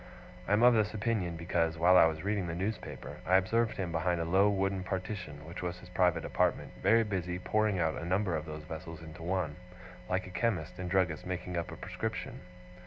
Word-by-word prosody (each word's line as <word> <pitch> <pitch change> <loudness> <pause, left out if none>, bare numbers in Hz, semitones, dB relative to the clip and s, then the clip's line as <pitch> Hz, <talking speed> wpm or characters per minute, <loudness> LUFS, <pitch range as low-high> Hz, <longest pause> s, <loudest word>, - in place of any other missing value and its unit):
I 100 - +2
am 110 +3 +4
of 125 0 +8
this 110 -1 +1
opinion, 100 -6 -1
because, 85 -1 0
while 90 +3 +5
I - - +9
was 80 0 -3
reading 100 -2 0
the 80 - -3
newspaper, 100 +5 -4
I 95 - +3
observed 110 +5 +2
him 90 -3 -2
behind 85 +1 0
a 85 - -1
low 95 +5 +4
wooden 95 -1 0
partition, 95 -5 -5
which 85 +2 -7
was 90 0 -3
his 90 0 -13
private 90 -2 +2
apartment, - - 0
very 115 0 +5
busy 90 -4 -2
pouring 105 +2 +1
out 80 -3 +1
of - - -5
a - - -5
number 95 0 +1
of 75 0 -3
those 75 0 -6
vessels 80 +1 -8
into 80 +1 -10
one, 85 -3 -1 0.5
like 90 0 0
a 90 - -9
chemist 90 -7 -1
and 90 -1 -3
druggist 90 -5 +1
making 90 -1 -4
up 85 -1 -2
a - - -6
prescription. - - -4
90 Hz, 215 wpm, -32 LUFS, 85-95 Hz, 0.5 s, I